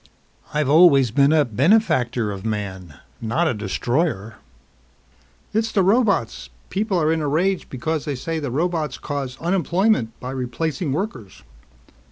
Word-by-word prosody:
I've 150 -2 0
always 140 -5 +6
been 140 +4 +4
a 155 -2 +4
benefactor 125 - +2
of 95 -1 -7
man, 95 -7 -4 0.3
not 120 +10 0
a 155 - +1
destroyer." 110 - -2 1.2
"It's 220 +1 0
the 195 - +2
robots. 190 - +1 0.2
People 200 -2 0
are 155 0 +2
in 160 - -1
a 150 - -1
rage 180 +6 0
because 155 +4 -3
they 145 -3 -2
say 160 +5 -3
the 145 -3 -4
robots 160 +3 -1
cause 140 -3 -5
unemployment 175 - 0
by 125 - -6
replacing 135 +4 -3
workers." 140 - -5
145 Hz, 140 wpm, -22 LUFS, 120-175 Hz, 1.2 s, always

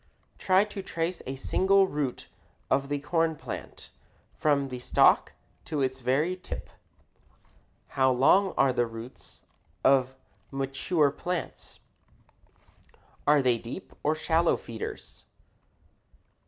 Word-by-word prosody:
Try 190 +1 +4
to 210 -1 -6
trace 170 -1 -3
a 135 - -3
single 195 +8 +3
root 145 -6 -3 0.4
of 140 +1 +1
the 145 - 0
corn 165 +2 0
plant - - -8 0.4
from 140 -2 +1
the 125 -1 -6
stalk 125 - +3 0.3
to 150 -3 -1
its 130 0 -2
very 140 +8 +1
tip. 180 - -8 1.2
How 130 -1 +2
long 180 +10 +4
are 135 -1 +4
the 120 -1 +1
roots 115 +3 -10 0.4
of 130 -1 +3 0.3
mature 135 +3 0
plants? 175 +4 -5 1.5
Are 145 -1 +5
they 125 -2 +2
deep 120 +12 -8
or 155 +2 +1
shallow 165 +2 +2
feeders? 115 -2 -8
140 Hz, 115 wpm, -28 LUFS, 130-170 Hz, 1.5 s, Are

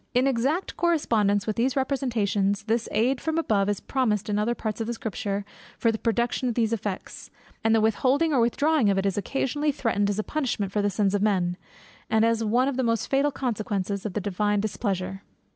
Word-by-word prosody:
In 250 +2 +4
exact 275 +7 0
correspondence 220 - +2
with 215 - -2
these 250 +3 +1
representations, 220 -7 0
this 225 +1 -1
aid 250 +4 +1
from 320 0 -1
above 205 -11 +1
is 205 -1 -1
promised 215 -5 -1
in 205 0 +1
other 235 +3 0
parts 220 -1 -4
of 225 - -3
Scripture 205 -3 -3 0.3
for 230 - +2
the 220 - -4
production 240 +2 0
of 235 - -3
those 230 -1 +1
effects; 205 -3 -5 0.3
and 225 0 +4
the 220 - +3
withholding 265 +8 +2
or 265 - +3
withdrawing 270 +1 +2
of 195 - +2
it 195 - 0
is 195 -1 +1
occasionally 275 +7 -1
threatened 225 -7 0
as 205 - -1
a 215 - 0
punishment 240 -10 -2
for 210 - 0
the 205 - +1
sins 200 0 +1
of 205 - +1
men, 185 -4 +1 0.5
and 220 0 +3
as 230 0 +1
one 240 +4 +2
of 275 -2 -2
the 260 - +1
most 230 -1 0
fatal 275 +2 +3
consequences 210 -7 -2
of 215 - -4
the 210 - -2
Divine 205 +1 0
displeasure. 195 -2 -2
220 Hz, 205 wpm, -26 LUFS, 205-255 Hz, 0.5 s, In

